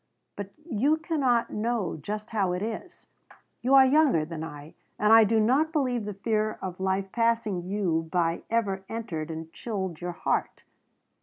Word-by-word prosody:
But 200 -1 -6 0.2
you 285 +3 +2
cannot 280 -8 +1
know 220 -3 -1
just 210 +8 -6
how 195 -5 +1
it 180 +2 -2
is. 230 +12 -6 0.6
You 260 +3 +4
are 265 -1 +9
younger 265 - +4
than 160 -1 -6
I, 150 -1 -9 0.2
and 210 +1 +4
I 225 0 +9
do 220 +1 +2
not 265 +9 +3
believe 255 -8 0
the 205 -1 -5
fear 215 +1 -1
of 185 -1 -6
life 190 0 -1
passing 230 -5 +1
you 170 -5 0
by 170 -2 +1
ever 200 -4 0
entered 190 -9 -4
and 160 0 -7
chilled 190 -8 -4
your 175 0 -3
heart. - - -2
210 Hz, 165 wpm, -27 LUFS, 180-235 Hz, 0.6 s, are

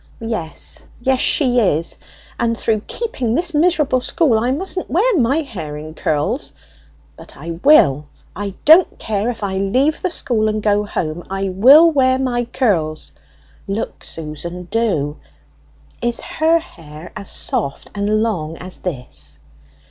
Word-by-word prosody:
yes, 195 -9 -4
yes, 260 +1 +1
she 250 -4 +4
is! 170 -7 0 0.4
And 230 -1 0
through 220 -2 +1
keeping 260 - -2
this 345 +1 0
miserable 300 -5 +2
school 255 -4 +2
I 240 +3 0
mustn't 370 +7 -2
wear 430 +7 +2
my 275 +2 +2
hair 165 - -7
in 155 +1 -8
curls! 150 -1 -1 0.6
But - - -14
I 165 +4 -6
will; 150 - +5 0.3
I 200 -1 -4
don't 320 +4 +6
care 215 +1 -2
if 230 -3 -5
I 190 -1 -1
leave 260 +10 +1
the 370 - 0
school 225 -9 -1
and 215 0 -2
go 210 0 +2
home, 170 -3 -3
I 195 0 -2
will 270 - +7
wear 260 -3 +3
my 245 -2 -1
curls! 185 - -1 0.6
Look, 200 +3 -4
Susan, 165 +3 -7
do! 160 -11 0 0.8
is 240 0 0
her 320 +1 +2
hair 165 - -10
as 200 - -7
soft 140 0 -3
and 210 +1 +1
long 165 -8 -2
as 180 +1 -7
this?" 75 - -6
215 Hz, 145 wpm, -19 LUFS, 165-265 Hz, 0.8 s, will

